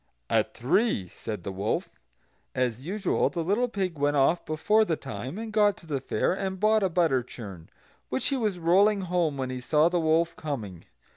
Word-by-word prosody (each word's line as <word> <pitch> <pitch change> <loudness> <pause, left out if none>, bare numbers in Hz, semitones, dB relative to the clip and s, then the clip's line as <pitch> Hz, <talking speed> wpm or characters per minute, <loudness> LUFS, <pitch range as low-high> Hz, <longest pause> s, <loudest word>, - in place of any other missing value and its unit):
"At - - +1
three," 125 - +1
said 105 +1 -7
the 100 - -4
wolf. 100 +3 -2 0.6
As 125 +2 -1
usual 195 0 +1
the 170 -2 -3
little 210 +8 +1
pig 190 -8 -3
went 145 0 +2
off 150 +6 +3
before 210 +8 +2
the 170 -7 0
time, 125 - -6
and 220 -1 -6
got 205 -2 +3
to - - -16
the 145 -4 -3
fair, 135 - 0
and 190 0 -3
bought 215 +1 +3
a 190 - +2
butter 165 -7 +2
churn, 100 -9 -10 0.4
which 130 - 0
he 275 - 0
was 215 -7 -1
rolling 195 +5 +4
home 175 -5 0
when 130 -1 -3
he 130 - -4
saw 150 +5 +3
the 175 0 +1
wolf 165 +1 +2
coming. 110 - -5
165 Hz, 195 wpm, -27 LUFS, 130-195 Hz, 0.6 s, rolling